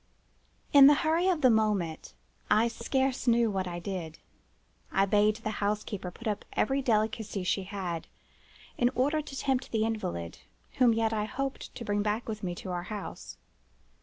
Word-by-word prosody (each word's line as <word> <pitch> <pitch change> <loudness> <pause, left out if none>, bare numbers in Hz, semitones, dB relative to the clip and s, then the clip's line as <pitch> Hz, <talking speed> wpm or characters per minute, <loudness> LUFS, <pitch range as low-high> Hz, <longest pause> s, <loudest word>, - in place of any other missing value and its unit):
"In 280 -1 +10
the 295 - +7
hurry 330 +3 +2
of 355 -5 +1
the 255 -3 +6
moment 205 -7 0 0.3
I 220 +2 +4
scarce 260 +3 -1
knew 235 -2 +4
what 190 -2 -2
I 175 -1 -4
did. 175 -3 -5 0.7
I 195 - +3
bade 210 +1 +3
the 215 -1 -4
housekeeper 205 -2 -2
put 230 +6 -9
up 210 -2 -2
every 270 +5 +1
delicacy 215 -4 0
she 190 +1 0
had, 185 -4 -4 0.7
in 245 - +4
order 290 +5 +2
to 285 -2 -9
tempt 265 -1 -1
the 220 -1 +1
invalid, 85 - -4 0.4
whom 245 -2 +6
yet 225 0 +1
I 210 -1 0
hoped 270 +5 -5
to 235 - -6
bring 205 0 0
back 210 +3 -1
with 215 -2 -4
me 175 -2 -3
to 185 - -7
our 175 -1 -2
house. 210 -2 -7
215 Hz, 170 wpm, -29 LUFS, 195-245 Hz, 0.7 s, In